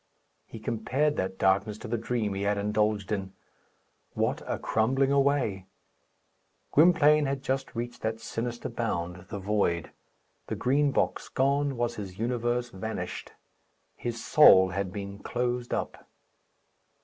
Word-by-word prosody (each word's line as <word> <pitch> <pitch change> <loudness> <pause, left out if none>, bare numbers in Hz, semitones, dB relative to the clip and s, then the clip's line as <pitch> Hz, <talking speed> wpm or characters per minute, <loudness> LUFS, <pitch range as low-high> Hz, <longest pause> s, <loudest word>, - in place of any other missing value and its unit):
He - - -9
compared 125 +7 0
that 95 0 -2
darkness 100 +2 +2
to - - -8
the 115 - -1
dream 115 -2 -1
he 95 - -3
had 100 +1 +1
indulged 105 0 0
in. 95 -2 -3 0.8
What - - 0
a - - -1
crumbling 135 +5 +1
away! 135 -9 +1 1.0
Gwynplaine 150 -2 +5
had 135 0 -3
just 135 0 -2
reached 120 +1 -5
that 110 0 -2
sinister 120 +1 -4
bound 90 -5 -3
the - - -4
void. 95 -4 0 0.6
The - - -3
Green 140 +3 +2
Box - - -1
gone 140 0 +1
was 120 0 -1
his 95 -3 -7
universe 120 +1 -1
vanished. 110 +4 -5 0.6
His 115 -2 -5
soul 95 -11 +7
had 95 +1 -3
been 100 0 -6
closed 120 +2 -2
up. - - -4
115 Hz, 135 wpm, -28 LUFS, 100-130 Hz, 1.0 s, soul